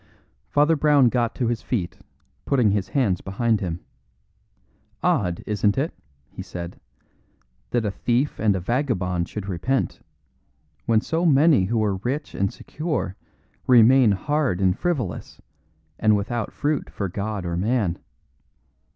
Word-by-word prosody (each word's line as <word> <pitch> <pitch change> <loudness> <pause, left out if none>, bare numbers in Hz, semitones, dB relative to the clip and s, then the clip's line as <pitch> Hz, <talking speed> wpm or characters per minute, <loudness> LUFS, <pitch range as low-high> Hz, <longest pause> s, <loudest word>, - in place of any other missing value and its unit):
Father 150 +3 +3
Brown 145 -4 +4
got 120 -1 0
to 125 - -1
his 115 -1 -1
feet, 105 -8 -3 0.4
putting 125 -7 +2
his 100 -2 0
hands 105 -11 +1
behind 110 +2 0
him. 90 -2 -3 1.2
"Odd, 105 - +1
isn't 105 -1 +1
it," 145 +5 -1 0.4
he - - -8
said, 85 0 -7 0.9
"that 120 -2 0
a 105 - 0
thief 125 +7 -1
and 105 -3 +2
a - - -1
vagabond 90 - -1
should 105 -2 -6
repent, 110 +9 -1 0.9
when 110 -1 +4
so 165 +7 -1
many 150 - +5
who 110 +2 0
are 100 -2 0
rich 135 +9 -3
and 100 0 0
secure 150 - -4 0.5
remain 125 0 +6
hard 140 - 0
and 95 -1 +2
frivolous, 130 - -3 0.6
and 110 -1 +4
without 110 +2 -3
fruit 150 0 -1
for 100 - -3
God 100 +1 -4
or 85 -1 -2
man? 100 -2 0
110 Hz, 135 wpm, -23 LUFS, 95-135 Hz, 1.2 s, remain